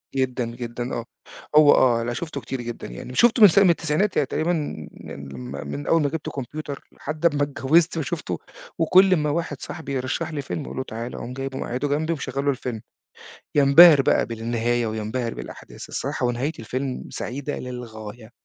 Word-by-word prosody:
جدًا، 130 -2 0
جدًا، 120 +1 -5
آه. 115 0 -3 0.5
هو 150 -1 +8
آه 115 -2 +4
لأ 120 - -2
شفته 155 +1 -5
كتير 125 +2 -5
جدًا 120 0 -6
يعني، - - -8
شفته 240 0 +4
من 210 - +12
س 180 - 0
من 195 - +6
التسعينات 170 +4 +1
يعني 145 - +3
تقريبًا 170 +5 0
مـن 75 - -6
لما 65 -1 -6
من 70 0 -6
أول 165 -1 +4
ما 145 - +1
جبت 160 0 -4
كمبيوتر 140 +2 -6
لحد 155 +3 -5
أما 145 -3 +3
اتجوزت 155 +4 +2
وشفته، 155 - -3 0.4
وكل 185 +3 +5
ما 150 -2 0
واحد 165 +3 -2
صاحبي 160 -5 -6
يرشح 135 +5 -2
لي 145 - -3
فيلم 140 +2 -5
أقول - - -8
له 130 - -1
تعالَ 115 0 -6
أقوم 125 - -6
جايبه 135 0 -5
مقعده 130 +4 -2
جنبي 155 +3 0
ومشغل 140 -2 -4
له 140 - +4
الفيلم، 120 -4 -5 0.7
ينبهر 145 +1 +8
بقى - - +2
بالنهاية 115 +1 -1
وينبهر 110 +2 -3
بالأحداث. - - -10
الصراحة - - -2
ونهاية 125 +5 0
الفيلم 130 +3 -4
سعيدة 140 +3 -4
للغاية. 115 -2 -8
135 Hz, 180 wpm, -24 LUFS, 120-155 Hz, 0.7 s, من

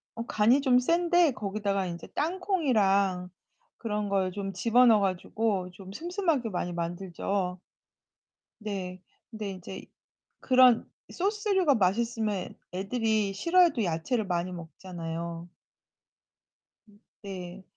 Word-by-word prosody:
어, 230 - -4
간이 235 +6 +3
좀 255 -3 +4
센데 340 +3 +3
거기다가 200 -2 -2
인제 170 -1 -7
땅콩이랑 220 - +1 0.5
그런 210 -2 -2
걸 190 -2 +1
좀 195 +1 -4
집어넣어 230 +3 +5
가지고 195 +1 -1
좀 190 +1 -11
슴슴하게 330 - -1
많이 180 -2 -3
만들죠. 180 +2 -3 1.0
네. 185 -3 -5 0.3
근데 215 -3 -5
인제 185 0 -8 0.5
그런 255 -3 +5 0.2
소스류가 390 - +1
맛있으면 215 0 0 0.2
애 185 - -3
애들이 215 -1 0
싫어해도 335 - +3
야채를 180 +7 -1
많이 180 0 -1
먹잖아요. 170 0 -6 1.7
네. 185 -1 -7
205 Hz, 235 characters per minute, -28 LUFS, 185-250 Hz, 1.7 s, 집어넣어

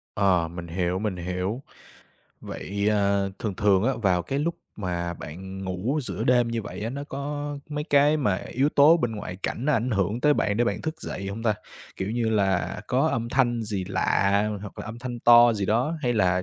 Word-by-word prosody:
Ờ, 90 -5 +2
mình 85 0 -7
hiểu, 90 +1 -1
mình 105 -3 -2
hiểu. 90 +8 -3 0.8
Vậy, 100 +2 -3
ờ, 100 -2 +2
thường 105 -4 -3
thường 100 -1 +3
á, 135 - +3
vào 90 -3 +2
cái 135 +10 -2
lúc 165 +3 0 0.2
mà 85 -3 -3
bạn 95 +5 -8
ngủ 95 +11 -1
giữa - - -4
đêm 120 -2 +3
như 115 -1 -2
vậy 100 - -7
á, 115 - -2
nó 140 +2 -5
có 145 +1 -4
mấy 150 0 -3
cái 145 0 +4
mà 105 -10 +1
yếu 135 +4 +1
tố 150 +3 +6
bên 120 -8 -1
ngoại 90 -3 -6
cảnh, 120 - -3
nó 150 - +2
ảnh 125 0 +1
hưởng 105 +3 0
tới 150 +1 +4
bạn 105 0 0
để 120 - +3
bạn 120 - -2
thức 160 0 -4
dậy 95 - -5
hông 110 +3 -5
ta? 110 -2 +2 0.4
Kiểu 95 +2 -3
như 115 -1 0
là 95 -4 +1
có 135 +5 +2
âm 115 -3 -1
thanh 120 -2 +1
gì 100 -4 -3
lạ, 100 +2 +1
hoặc 105 - -9
là - - -5
âm 115 +2 -7
thanh 120 -1 -5
to 120 0 +7
gì 100 -3 -2
đó, 125 +9 +1
hay 120 -1 +1
là 90 -4 +2
110 Hz, 215 wpm, -25 LUFS, 95-125 Hz, 0.8 s, to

